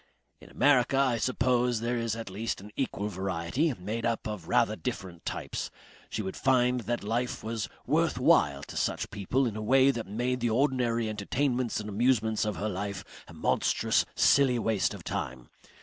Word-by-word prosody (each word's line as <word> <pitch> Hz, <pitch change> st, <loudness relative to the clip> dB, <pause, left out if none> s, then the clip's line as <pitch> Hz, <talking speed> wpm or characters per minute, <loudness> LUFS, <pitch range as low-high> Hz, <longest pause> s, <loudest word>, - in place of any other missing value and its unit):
"In -, -, -15 dB
America 135 Hz, -2 st, +3 dB
I 130 Hz, -4 st, +2 dB
suppose 125 Hz, 0 st, +1 dB
there 120 Hz, +2 st, -1 dB
is 115 Hz, -1 st, -1 dB
at 115 Hz, -4 st, -6 dB
least 110 Hz, +4 st, -3 dB
an 105 Hz, +2 st, -11 dB
equal 105 Hz, -6 st, -2 dB
variety, 95 Hz, -, -1 dB
made 105 Hz, +5 st, -4 dB
up 115 Hz, -1 st, -1 dB
of 105 Hz, -6 st, -6 dB
rather -, -, +2 dB
different 85 Hz, -3 st, -6 dB
types. -, -, -4 dB, 0.4 s
She 110 Hz, -, -3 dB
would 95 Hz, -, -4 dB
find 125 Hz, -1 st, +2 dB
that 120 Hz, -2 st, -1 dB
life 120 Hz, +4 st, -2 dB
was 115 Hz, -1 st, -3 dB, 0.2 s
worth -, -, +1 dB
while 70 Hz, -1 st, +3 dB
to -, -, -9 dB
such -, -, -1 dB
people 125 Hz, +7 st, 0 dB
in 115 Hz, -4 st, -2 dB
a 110 Hz, -, -4 dB
way 130 Hz, +5 st, +5 dB
that 115 Hz, -6 st, -5 dB
made 120 Hz, +5 st, -1 dB
the 120 Hz, -1 st, 0 dB
ordinary 120 Hz, -2 st, +1 dB
entertainments 120 Hz, +4 st, -1 dB
and 105 Hz, -, -6 dB
amusements 110 Hz, 0 st, +1 dB
of 105 Hz, -, -2 dB
her 105 Hz, -, -2 dB
life 100 Hz, -1 st, -4 dB, 0.2 s
a -, -, -12 dB
monstrous -, -, +2 dB
silly 135 Hz, -3 st, +4 dB
waste 110 Hz, -3 st, 0 dB
of -, -, -11 dB
time. 65 Hz, -1 st, -5 dB
115 Hz, 180 wpm, -29 LUFS, 105-125 Hz, 0.4 s, way